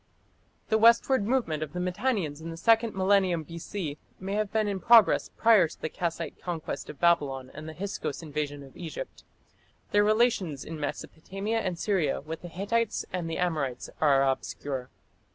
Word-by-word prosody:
The 220 - +3
westward 230 0 +5
movement 225 - 0
of 150 -2 -4
the 180 - -3
Mitannians 180 - -1
in 165 - -6
the 165 - -7
second 225 +2 +3
millennium 190 -3 +2
B.C. 165 -1 -5 0.2
may 195 +1 -4
have 210 -1 -1
been 215 -1 +1
in 200 -2 -2
progress 230 0 +6
prior 220 -6 +6
to 155 - -13
the 160 - -3
Kassite 170 -1 -4
conquest 170 -3 -4
of 140 - -9
Babylon 140 -7 +2
and 155 +2 -8
the 160 - -9
Hyksos 190 -5 -4
invasion 145 -2 -4
of 135 - -15
Egypt. 175 - -7 0.7
Their 205 0 +5
relations 210 - +2
in 160 -1 -6
Mesopotamia 195 +9 -3
and 185 -5 -2
Syria 175 -7 0
with 160 +3 -7
the 175 - -7
Hittites 205 +6 -1
and 175 -2 -2
the 165 - -3
Amorites 150 -8 -2
are 135 -3 +4
obscure. 135 -1 -3
175 Hz, 170 wpm, -28 LUFS, 155-205 Hz, 0.7 s, progress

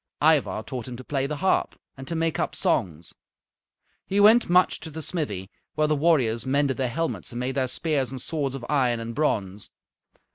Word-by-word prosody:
Ivar 145 -8 +2
taught 125 +1 -6
him 125 -1 -7
to 130 - -9
play 135 0 -1
the 150 - -3
harp 190 - +1 0.2
and 135 0 -10
to 170 - -3
make 165 -1 0
up - - -1
songs. 85 -2 -1 0.9
He 200 - 0
went 220 +2 +6
much 180 +1 +4
to 160 - -8
the 160 +1 -7
smithy, 105 - -4 0.2
where 155 - +2
the 150 0 +2
warriors 135 -8 +2
mended 140 0 +1
their 130 -2 0
helmets 165 +3 -3
and 120 - -4
made 125 +2 -2
their 130 -1 0
spears 140 0 -1
and 130 0 -5
swords 140 -1 -2
of 125 -3 -7
iron 125 -5 +1
and 115 0 -5
bronze. 105 -9 -1
135 Hz, 195 wpm, -25 LUFS, 120-155 Hz, 0.9 s, went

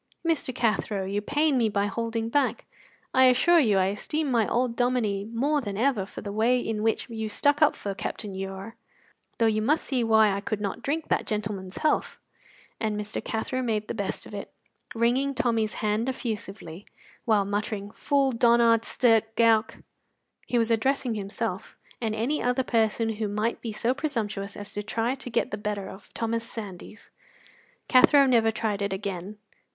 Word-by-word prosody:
Mr. 320 -5 +1
Cathro, 215 -5 0
you 200 +2 -2
pain 290 +4 +1
me 225 -2 +2
by 200 -1 0
holding 230 +2 -2
back; 285 +5 0 0.5
I 260 0 +6
assure 260 +7 +5
you 215 -9 +3
I 190 - +3
esteem 300 +7 -2
my 230 -3 +2
old 245 -1 0
Dominie 235 -6 0
more 275 +7 0
than 205 -5 -5
ever 225 -5 +1
for - - -8
the 200 - -5
way 230 +4 +2
in 225 -3 -3
which 225 0 0
you 220 -2 -4
stuck 285 +7 +2
up 305 - +5
for 200 - -4
Captain 200 +1 -5
Ure, 195 +4 -6 0.6
though 230 - +2
you 215 -1 +2
must 300 +9 +1
see 255 -3 0
why 220 -2 +5
I 200 0 -2
could 215 0 -3
not 200 -2 -3
drink 305 +3 -2
that - - 0
gentleman's 205 -3 -4
health." 310 - 0 0.6
And 215 -1 -1
Mr. 210 +1 -4
Cathro 255 +4 -2
made 215 -4 -1
the - - -3
best 200 -4 -4
of - - -12
it, - - -6 0.4
wringing 255 +4 +1
Tommy's 225 -4 0
hand 215 +4 0
effusively, 205 -7 -5 0.4
while 215 -4 +3
muttering, 205 0 -3
"Fool, 275 +3 +1
donnard 235 -1 +4
stirk, 225 -2 +2
gowk!" 230 -1 +2 0.6
He 245 - 0
was 230 0 +2
addressing 255 +2 +1
himself 200 -1 -4 0.2
and 220 -2 -1
any 250 +8 -1
other 250 +1 +1
person 225 -1 +1
who 215 -1 -1
might 210 +3 -1
be 230 - -4
so 230 +3 0
presumptuous 215 -9 -3
as 205 0 -7
to 205 - -2
try 225 +3 -1
to 265 -2 -8
get 235 - 0
the 205 - -3
better 205 -2 -3
of 195 +1 -12
Thomas 230 0 -1
Sandys. 210 -1 -9 0.8
Cathro 275 +2 +6
never 230 -4 +4
tried 215 -2 -2
it 200 -1 -1
again. 195 +1 -5
225 Hz, 175 wpm, -26 LUFS, 205-245 Hz, 0.8 s, I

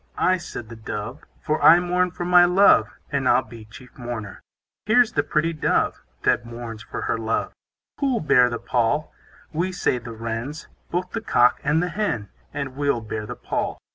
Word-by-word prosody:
I, 185 0 +3
said 145 -10 -8
the 115 - -8
Dove; 110 +4 -6 0.2
For 155 +1 -1
I 170 +2 +8
mourn 180 +1 +1
for 175 0 -6
my 180 0 +7
love; 175 - +5 0.2
And 140 -3 +1
I'll 130 - +4
be 115 -2 -12
chief 125 +4 -15
mourner. 120 -4 -6 0.5
Here's 240 +1 +4
the 145 - +1
pretty 160 +3 0
Dove, 155 - 0 0.2
That - - +2
mourns 115 -2 -8
for - - -6
her - - -1
love. 110 0 -1 0.5
Who'll 270 -4 +1
bear 125 -6 +4
the 120 - -3
pall? 125 +7 0 0.4
We, 175 +4 -1
say 155 -8 0
the 115 -1 -9
Wrens, 115 +7 -5 0.2
Both 180 +1 -2
the 225 - -3
cock 125 - +3
and 150 +4 +2
the 180 - -1
hen, 170 - -2 0.2
And 140 -3 -5
we'll 140 -4 0
bear 110 -1 -5
the - - -6
pall. - - -3
140 Hz, 185 wpm, -23 LUFS, 115-175 Hz, 0.5 s, I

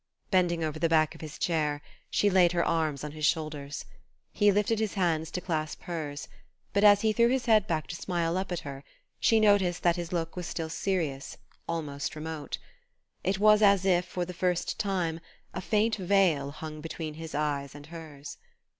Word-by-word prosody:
Bending 175 -3 +2
over 155 0 -3
the 165 - +2
back 155 -1 +3
of - - -13
his 155 -2 -8
chair, 150 -4 0 0.3
she 205 - +2
laid 180 -3 +4
her 170 -1 +1
arms 155 -4 0
on 150 - -4
his 155 0 -8
shoulders. 150 -2 -1 0.5
He 205 -1 +4
lifted 210 +2 +1
his 220 -3 -1
hands 165 -4 +1
to 180 - -4
clasp 155 -4 -3
hers, 150 -5 -5 0.5
but, 200 - +2
as 205 -1 +7
he 220 -1 +2
threw 235 +2 +4
his 255 +1 0
head 215 -3 +4
back 155 -6 -1
to 165 - -6
smile 170 -1 -1
up 190 0 -2
at 175 0 -2
her 140 -3 -8 0.4
she 225 - +4
noticed 200 -5 +3
that 175 0 +3
his 175 -1 -4
look 165 -2 -2
was 180 -2 -4
still 160 -1 -4
serious, 160 -7 -2 0.3
almost 150 -4 -3
remote. 155 -1 -5 0.7
It 190 0 +1
was 210 +1 +5
as 200 -2 +5
if, 180 -2 +3
for 180 0 -3
the 180 - -7
first 180 0 -1
time, 180 -5 -1 0.3
a - - -4
faint 220 +3 +1
veil 180 -7 +2
hung 155 +1 -7
between 160 -1 -5
his 160 -1 -7
eyes 145 -2 -2
and 145 0 -10
hers. 155 -3 -9
170 Hz, 190 wpm, -29 LUFS, 155-190 Hz, 0.7 s, as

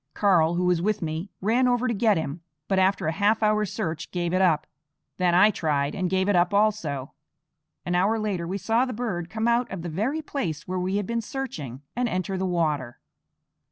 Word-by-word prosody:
Karl, 175 -5 +3
who 180 +1 0
was 180 -2 +2
with 210 0 0
me, 160 +4 -3
ran 235 +6 +3
over 245 0 +2
to 235 - 0
get 215 -1 +3
him, 160 +1 -4 0.3
but 195 -1 +2
after 190 -1 +2
a 160 - +1
half 205 +5 +2
hour's 215 -2 +2
search 160 0 -3
gave 175 -1 -2
it 185 - +2
up. 165 -5 +3 0.5
Then 180 -1 +2
I 205 +4 +6
tried, 145 -6 0
and 185 -2 -1
gave 190 +1 +1
it 205 - +3
up 175 +2 +3
also. 170 -11 0 0.7
An 175 - -1
hour 195 +5 +2
later 200 -6 -2
we 190 +3 -2
saw 225 +5 +1
the 255 -1 -3
bird 200 -7 -3
come 220 +1 -1
out 235 +1 +2
of 190 -3 -5
the 175 - -4
very 240 - -1
place 165 - -4
where 185 0 -2
we 185 +2 -1
had 205 -1 0
been 235 +3 -1
searching, 165 - -6
and 245 0 0
enter 185 +1 -2
the 190 0 -1
water. 150 -8 -1
185 Hz, 215 wpm, -25 LUFS, 170-215 Hz, 0.7 s, I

